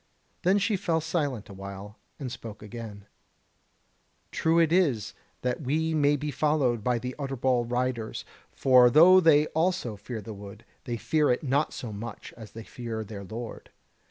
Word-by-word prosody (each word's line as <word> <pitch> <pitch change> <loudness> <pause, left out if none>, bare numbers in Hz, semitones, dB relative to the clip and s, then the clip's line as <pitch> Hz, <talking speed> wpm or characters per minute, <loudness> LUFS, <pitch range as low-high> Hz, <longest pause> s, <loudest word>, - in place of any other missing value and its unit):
Then 185 +2 +3
she 205 +1 +1
fell 170 -4 0
silent 145 - -2
a 100 - -10
while, 100 +2 -9 0.2
and 130 -4 -5
spoke 115 -3 -9
again: 105 -2 -8 1.3
"True 165 +1 +1
it 165 -1 +4
is 145 - +2 0.3
that 125 +2 -1
we 160 +4 0
may 145 -1 +3
be 145 +1 -3
followed 135 -6 +1
by 125 0 +1
the 125 +2 -5
Utterbol 130 -3 0
riders; 125 -2 -2 0.3
for 125 -2 +5
though 175 +8 +8
they 155 -4 +5
also 165 - 0
fear 110 +3 -7
the 110 +1 -8
wood, 100 +1 -11 0.2
they 120 -3 -3
fear 150 +5 +1
it 125 - +1
not 140 +2 +1
so 115 -4 -6
much 110 +2 -8
as 110 -3 -12
they 115 - -8
fear 115 -1 -5
their 100 -1 -8
Lord. 115 +4 -8
125 Hz, 165 wpm, -27 LUFS, 110-155 Hz, 1.3 s, though